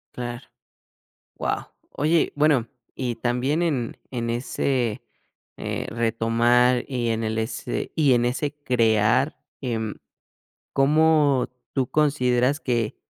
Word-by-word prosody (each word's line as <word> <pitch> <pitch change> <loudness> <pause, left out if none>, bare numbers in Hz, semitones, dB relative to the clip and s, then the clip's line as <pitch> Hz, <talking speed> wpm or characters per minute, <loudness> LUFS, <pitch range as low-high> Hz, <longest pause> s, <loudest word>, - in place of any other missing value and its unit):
Claro, 120 0 -6 0.9
wao, - - -3 0.2
oye, 155 +3 +1
bueno 145 -6 +3 0.3
y 125 -3 -3
también 125 +6 0
en 135 -9 -1 0.2
en 115 -1 -2
ese, 120 -1 -1 0.5
eh, - - -4
retomar, 120 +2 +2
y 125 -3 -2
en 115 0 -1
el 110 0 -2
ese 110 - -3
y 145 -5 +4
en 120 0 +3
ese 135 +4 -1
crear, 115 +2 +2 0.2
em, 115 -5 -3 0.8
¿cómo 150 -1 +3 0.2
tú 130 -3 0
consideras 140 -2 +2
que 120 -4 -1
125 Hz, 110 wpm, -24 LUFS, 115-140 Hz, 0.9 s, y